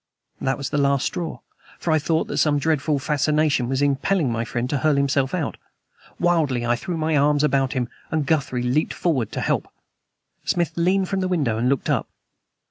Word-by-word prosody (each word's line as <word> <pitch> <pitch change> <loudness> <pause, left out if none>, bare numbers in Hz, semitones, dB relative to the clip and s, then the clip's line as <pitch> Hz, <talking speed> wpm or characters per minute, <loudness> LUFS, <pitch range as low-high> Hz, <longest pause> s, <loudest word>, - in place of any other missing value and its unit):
That 135 0 0
was 140 - -4
the 145 - +1
last 140 -1 +2
straw; 170 -2 -4 0.4
for 170 - -2
I 155 - +4
thought 160 +2 0
that - - -3
some 150 -2 +3
dreadful 150 0 +1
fascination 150 -2 +1
was 135 +1 0
impelling 145 +1 +1
my 115 0 -1
friend 120 +1 -2
to 145 - 0
hurl 155 +2 +2
himself 140 -1 +1
out! 160 -5 -2 0.6
Wildly 155 -9 +1
I 120 0 +2
threw 165 +8 -4
my 155 0 0
arms 145 +1 +3
about 135 -3 +2
him, 125 -2 -1 0.2
and 155 -2 0
Guthrie 135 -4 0
leaped 130 +6 0
forward 135 - 0
to - - -2
help. - - 0 0.8
Smith 170 -2 0
leaned 185 +3 +2
from 195 0 -1
the 185 - 0
window 140 -12 0
and 125 +2 +1
looked 135 -1 0
up. - - 0
145 Hz, 195 wpm, -23 LUFS, 135-160 Hz, 0.8 s, I